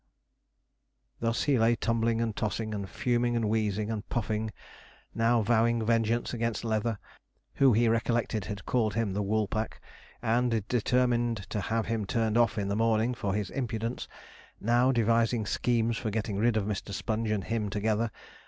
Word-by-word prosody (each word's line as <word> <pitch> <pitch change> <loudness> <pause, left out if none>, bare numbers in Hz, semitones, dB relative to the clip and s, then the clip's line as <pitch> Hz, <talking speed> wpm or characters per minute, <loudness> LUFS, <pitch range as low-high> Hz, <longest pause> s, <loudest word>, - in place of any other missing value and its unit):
Thus 115 0 0
he 140 -4 +2
lay 115 +1 +4
tumbling 115 0 0
and 115 -2 -1
tossing, 110 -2 -2
and 100 -2 -4
fuming 120 -1 0
and 115 -2 +1
wheezing 105 0 0
and 110 0 -5
puffing, 110 -1 -1 0.6
now 115 0 +2
vowing 115 +1 +2
vengeance 115 +1 +1
against 115 -1 -2
Leather, 110 0 0 0.6
who 135 -3 +5
he 115 +2 +3
recollected 115 -2 0
had 100 -2 -6
called 110 -4 +1
him 110 -4 0
the 105 - -1
'Woolpack,' 110 +1 -1 0.4
and 115 -2 +1
determining 120 0 +2
to 105 - -2
have 115 +3 -1
him 115 -2 -1
turned 110 +1 0
off 115 -1 +3
in 100 -1 -1
the 100 - -1
morning 115 +2 +2
for 100 -4 -2
his 105 -3 -2
impudence 115 -2 -3 0.5
now 120 +4 +3
devising 115 -1 +2
schemes 115 +1 +1
for 110 - -2
getting 105 -1 -2
rid 115 +1 +2
of 105 - 0
Mr. 100 -1 -4
Sponge 110 +2 -2
and 105 -3 0
him 110 -3 -2
together. 110 +2 0
115 Hz, 160 wpm, -29 LUFS, 110-115 Hz, 0.6 s, who